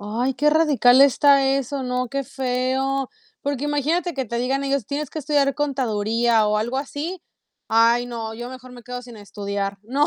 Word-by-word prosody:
Ay, 235 +6 -2
qué 300 +3 +2
radical 285 -5 +4
está 275 0 +5
eso, 275 0 -3
¿no?, 250 0 -2
qué 275 +2 -3
feo. 265 +1 -1 0.3
Porque 285 0 -2
imagínate 305 +4 0
que 265 -3 -3
te 235 +1 -4
digan 270 +3 -1
ellos: 275 -5 -1
"Tienes 290 0 -3
que 310 - -6
estudiar 280 -1 +1
contaduría" 230 -5 +1
o 210 - +1
algo 240 +5 -2
así. 310 +6 -5 0.5
Ay, 230 +2 +4
no, 225 -2 -5
yo 240 +2 -7
mejor 255 -1 -11
me 245 -1 -12
quedo 250 +1 -7
sin 240 -2 -12
estudiar. 200 -1 -4
No 275 +7 +1
255 Hz, 180 wpm, -22 LUFS, 235-280 Hz, 0.5 s, está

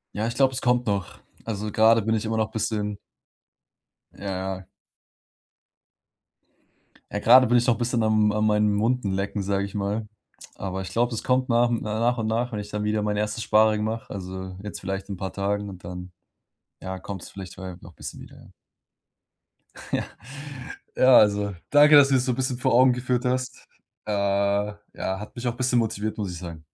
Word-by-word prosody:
Ja, 110 +2 -1
ich 115 - -4
glaub, 135 -1 +4
es 130 - -3
kommt 125 -1 +2
noch. 100 -3 -2 0.3
Also 105 -1 -3
grade 110 +2 +5
bin 110 +2 0
ich 110 - -2
immer 110 0 -1
noch 110 -1 0
bisschen 105 -2 -2 1.1
Ja, - - -14 0.3
ja. 95 0 -14 2.4
Ja, - - -2
grade 130 0 +7
bin 120 +2 +4
ich 120 - +2
noch 115 -2 +3
bisschen 120 -1 0
am 110 -1 +3
an 105 0 +1
meinen 105 -1 +2
Wunden 115 -4 0
lecken, 100 +1 -2
sage 100 0 0
ich 100 - -6
mal. 105 +2 -2 0.5
Aber 95 0 -4
ich 95 - -6
glaube, 120 +1 +1
es 110 - -4
kommt 130 0 +1
nach 120 0 +3
hm, 115 - 0
nach 115 +3 0
und 110 -1 -1
nach, 120 +3 -1
wenn 105 - -3
ich 105 0 -7
dann 105 0 -3
wieder 105 0 0
mein 105 0 -1
erstes 105 +2 -2
Sparring 110 0 +3
mache, 110 0 -4
also, 95 -1 -6
jetzt 105 -3 -7
vielleicht 95 +1 -4
in 100 - -5
paar 95 0 -5
Tagen 100 +1 -2
und 90 -2 -11
dann 90 0 -7 0.7
ja, 95 0 -5
kommt's 95 0 -7
vielleicht 95 -3 -9
bald 90 -1 -8
noch 85 - -12
bisschen - - -8
wieder, - - -14
ja. - - -16 1.4
Ja. - - +1 0.9
Ja, 130 0 +7
also, 100 -1 +3 0.2
danke, 150 +1 +7
dass 145 -1 +8
du's 135 - +2
mir - - +2
so 125 0 0
bisschen 130 0 -1
vor 125 - +1
Augen 125 +1 +6
geführt 125 0 -1
hast. 125 0 -2 0.4
Äh, 110 - -3
ja, 100 0 +1 0.5
hat 105 - -10
mich 120 +1 -4
auch 120 - -1
bisschen 125 -1 +2
motiviert, 110 -1 -2
muss 100 -4 -3
ich 85 - -7
sagen. 85 -3 -8
105 Hz, 195 wpm, -25 LUFS, 100-120 Hz, 2.4 s, dass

